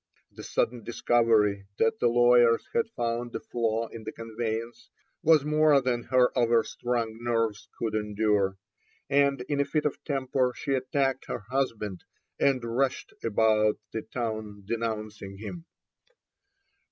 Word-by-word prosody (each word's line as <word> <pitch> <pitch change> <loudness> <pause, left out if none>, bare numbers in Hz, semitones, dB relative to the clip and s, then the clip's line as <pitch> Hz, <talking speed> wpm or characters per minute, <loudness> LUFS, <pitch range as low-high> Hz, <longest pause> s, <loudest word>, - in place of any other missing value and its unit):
The - - -11
sudden 120 -1 -1
discovery 110 -4 +2
that 115 - +2
the 120 - +3
lawyers 120 -1 +5
had 230 -1 +1
found 120 0 -2
a - - -1
flaw 115 -1 -1
in 115 - -9
the 110 - -5
conveyance 115 0 -5 0.3
was 155 -2 +5
more 150 -1 +4
than 125 -2 -1
her 125 -1 +3
overstrung 115 -1 0
nerves 115 -3 -1
could 110 -2 -2
endure, 105 -2 +1 0.5
and 140 -1 +3
in 140 +3 -2
a - - +4
fit 150 +2 -1
of 150 - -2
temper 130 -3 0
she 140 - -2
attacked 135 0 0
her 105 - -4
husband, 110 -8 -2 0.4
and 135 -3 +2
rushed 125 +3 -1
about 110 -1 +3
the 110 - -3
town 110 -4 -5
denouncing 110 -3 -4
him. 165 - -8
115 Hz, 135 wpm, -28 LUFS, 110-130 Hz, 0.5 s, lawyers